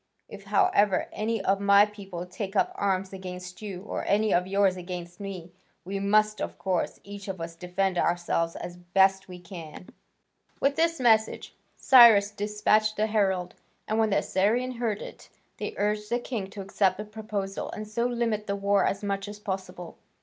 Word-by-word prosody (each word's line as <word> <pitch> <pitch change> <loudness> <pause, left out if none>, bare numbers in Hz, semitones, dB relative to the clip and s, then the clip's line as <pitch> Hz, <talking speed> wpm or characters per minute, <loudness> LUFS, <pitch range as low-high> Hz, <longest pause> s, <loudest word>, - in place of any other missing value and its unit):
If, 200 -1 -11
however, 200 -1 +2
any 220 -1 -2
of 195 0 +2
my 200 0 +6
people 195 -4 -8
take 195 +2 -6
up - - +2
arms 195 -1 -1
against 180 0 -8
you, 195 -3 -6
or - - -4
any 210 +1 +2
of 180 +1 +2
yours 195 -1 +2
against 175 -1 -7
me, 190 -4 -7 0.3
we 195 +2 -3
must, 215 +1 +2
of - - -4
course, 185 -3 -2
each 200 0 -9
of 190 -2 -5
us, 165 0 -5
defend 180 +1 -1
ourselves 170 -1 0
as 175 0 -7
best 190 +2 +2
we 180 -1 -9
can." 170 -2 -10 0.7
With 275 +1 +2
this 330 0 +1
message 220 -3 +2 0.2
Cyrus 225 -6 +7
despatched 210 +1 +1
the 215 - +2
herald, 190 -5 0 0.3
and 215 +1 0
when 220 -1 +3
the 200 - +2
Assyrians 235 +6 0
heard 225 -4 -2
it, - - -11 0.3
they - - -5
urged 210 +1 -1
the 240 - +1
king 230 -5 -4
to 200 0 -8
accept 190 -1 +1
the 210 - -5
proposal, 210 -2 -5
and 215 0 -6
so 235 +3 -1
limit 230 -3 -1
the 200 - -1
war 200 0 +2
as 195 +1 -2
much 200 0 -2
as 205 0 -8
possible. 190 -4 -6
200 Hz, 180 wpm, -27 LUFS, 185-215 Hz, 0.7 s, Cyrus